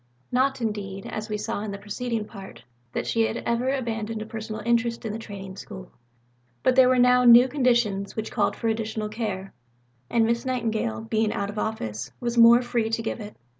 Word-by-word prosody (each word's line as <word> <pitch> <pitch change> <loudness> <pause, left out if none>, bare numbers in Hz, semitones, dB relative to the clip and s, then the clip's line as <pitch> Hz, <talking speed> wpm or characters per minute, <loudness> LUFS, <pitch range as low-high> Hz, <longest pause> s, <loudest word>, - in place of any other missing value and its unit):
Not, 260 +1 +1
indeed, 200 -3 -3
as 215 +1 -5
we 210 - -1
saw 210 -1 -3
in 215 - -4
the 200 - -5
preceding 215 +2 -3
Part, 195 -3 -11 0.3
that - - -3
she 230 - +1
had 230 - -3
ever 235 +2 0
abandoned 225 -4 -2
a - - -10
personal 220 -1 -6
interest 235 0 +1
in 215 - -3
the 225 - -4
Training 195 -3 -8
School, 60 - -9 0.7
but 255 - +3
there 260 -1 +7
were 255 - +3
now 250 0 +5
new 240 +1 +8
conditions 240 -7 +1
which 220 -1 -4
called - - +1
for 230 - -3
additional 220 -1 -2
care, 210 -4 -4 0.6
and 230 -1 +3
Miss 235 +1 0
Nightingale, 220 - -1
being 215 - 0
out 200 0 -2
of 210 - -5
office, 110 - -3
was 240 -1 -2
more 235 +1 +7
free 235 -2 -1
to 225 0 -1
give 225 - -3
it. 210 -1 -8
225 Hz, 200 wpm, -25 LUFS, 210-235 Hz, 0.7 s, new